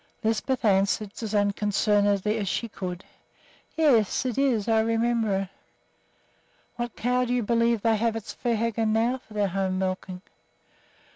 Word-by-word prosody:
Lisbeth 225 +3 0
answered 200 +1 +2
as 220 -2 -3
unconcernedly 205 0 +1
as 200 -3 -2
she 235 - -2
could, 185 -4 -6 0.7
"Yes, 260 -8 +3
it 250 -3 -1
is; 250 -7 +1
I 225 -1 +3
remember 225 -2 +1
it." 195 - -6 1.3
"What 240 -1 -4
cow 250 +1 +1
do 245 0 -1
you 245 - 0
believe 230 0 +1
they 225 -1 +3
have 225 +1 0
at 225 - -5
Svehaugen 230 -2 -1
now 235 +4 +1
for 220 -3 -17
their 205 -2 +1
home 190 0 -1
milking?" 185 0 -3
220 Hz, 145 wpm, -26 LUFS, 200-235 Hz, 1.3 s, Yes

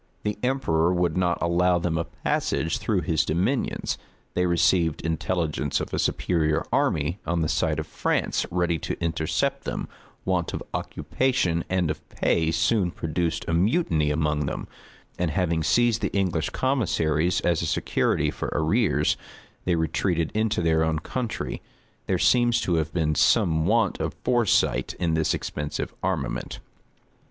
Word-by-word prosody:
The 105 0 -2
emperor 105 -11 +1
would 90 -2 +1
not 90 -1 +1
allow 90 +1 +3
them 85 -1 -1
a 85 0 -1
passage 80 +1 -1
through 100 -5 0
his 80 -1 +1
dominions: 90 - -1 0.3
they 90 0 +1
received 85 -2 +2
intelligence 80 -2 -1
of - - -5
a - - 0
superior 80 -2 +1
army 80 +5 +1
on 85 -1 0
the 80 - +1
side - - 0
of - - -3
France - - 0
ready 85 -2 0
to - - -4
intercept 80 -2 -1
them: - - -4 0.4
want 90 -3 0
of - - -5
occupation 95 -11 0
and 90 -4 +1
of - - -6
pay 80 -1 +1
soon 90 +4 +2
produced 85 0 -2
a 80 - -1
mutiny 85 - +2
among 75 -1 0
them; - - -4 0.5
and 90 -2 +1
having 85 0 0
seized 120 +6 +2
the - - -1
English 85 -5 0
commissaries 90 - +1
as 85 -2 +1
a 85 - -1
security - - +1
for - - -4
arrears, - - +2 0.5
they 90 - +2
retreated 85 +1 0
into 110 -4 0
their 80 -1 +3
own 80 -1 +1
country. 115 +9 -4 0.5
There - - +1
seems 120 -1 +3
to 90 - 0
have 80 -1 -1
been 80 -3 0
some 80 +2 +3
want 110 -2 +2
of - - -2
foresight 120 -4 +2
in 85 -2 +1
this 80 -1 +1
expensive 75 -1 -4
armament. 65 -3 -2
85 Hz, 150 wpm, -25 LUFS, 80-95 Hz, 0.5 s, allow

